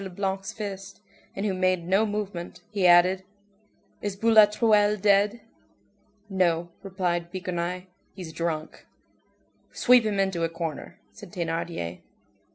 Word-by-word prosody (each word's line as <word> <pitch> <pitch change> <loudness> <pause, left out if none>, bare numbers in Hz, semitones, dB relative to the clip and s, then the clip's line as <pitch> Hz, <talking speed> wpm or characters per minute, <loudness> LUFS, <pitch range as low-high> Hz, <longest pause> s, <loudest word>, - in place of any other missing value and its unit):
Leblanc's 195 0 -3
fist, 200 -2 -7 0.4
and 195 - -3
who 200 - 0
made 185 -2 0
no 195 +4 +3
movement, 205 -4 -5
he 200 -4 +2
added:— 180 +2 +5 0.8
"Is 205 -2 -3
Boulatruelle 210 -1 +4
dead?" 205 +3 +3 0.9
"No," 175 -3 0
replied 180 -3 -2
Bigrenaille, 180 -1 -3 0.3
"he's 175 -4 -8
drunk." 160 -2 -4 0.8
"Sweep 250 -1 +5
him 210 -2 -1
into 190 -3 0
a 165 - +1
corner," 165 -2 -6
said 205 -5 -13
Thénardier. 165 - -4
190 Hz, 115 wpm, -26 LUFS, 175-205 Hz, 0.9 s, added